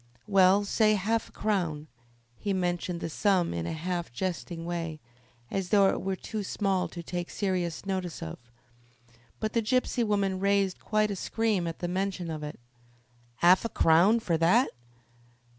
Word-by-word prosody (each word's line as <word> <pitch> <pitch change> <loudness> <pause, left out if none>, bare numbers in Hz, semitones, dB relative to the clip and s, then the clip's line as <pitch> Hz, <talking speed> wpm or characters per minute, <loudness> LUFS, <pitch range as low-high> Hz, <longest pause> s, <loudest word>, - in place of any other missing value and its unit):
"Well, 195 0 +5
say 215 +1 +3
half 220 +3 -1
a - - -20
crown." 175 -8 -1 0.5
He 200 - -2
mentioned 175 -1 -1
the - - -2
sum 190 -1 +2
in 85 -1 -3
a - - -2
half 175 0 -3
jesting 170 +3 -4
way, 165 -2 -4 0.5
as 190 -2 -2
though 200 -2 +5
it - - -1
were 190 0 -1
too 215 +3 -5
small 195 -2 0
to 170 - -8
take 175 +1 -4
serious 180 -4 -2
notice 185 -3 -3
of, 80 - -6 1.0
but 215 0 -2
the 230 - +2
gypsy 245 +1 +1
woman 200 -3 0
raised 200 -1 +1
quite 215 0 +1
a - - -2
scream 210 -2 0
at 165 - -4
the 175 - -3
mention 185 -1 -2
of 155 -1 -5
it. 150 -2 -7 0.8
"'Arf 180 +2 +6
a 230 - -2
crown! 180 +8 +4
for 175 -7 0
that?" 180 +11 +4
185 Hz, 165 wpm, -28 LUFS, 170-205 Hz, 1.0 s, Arf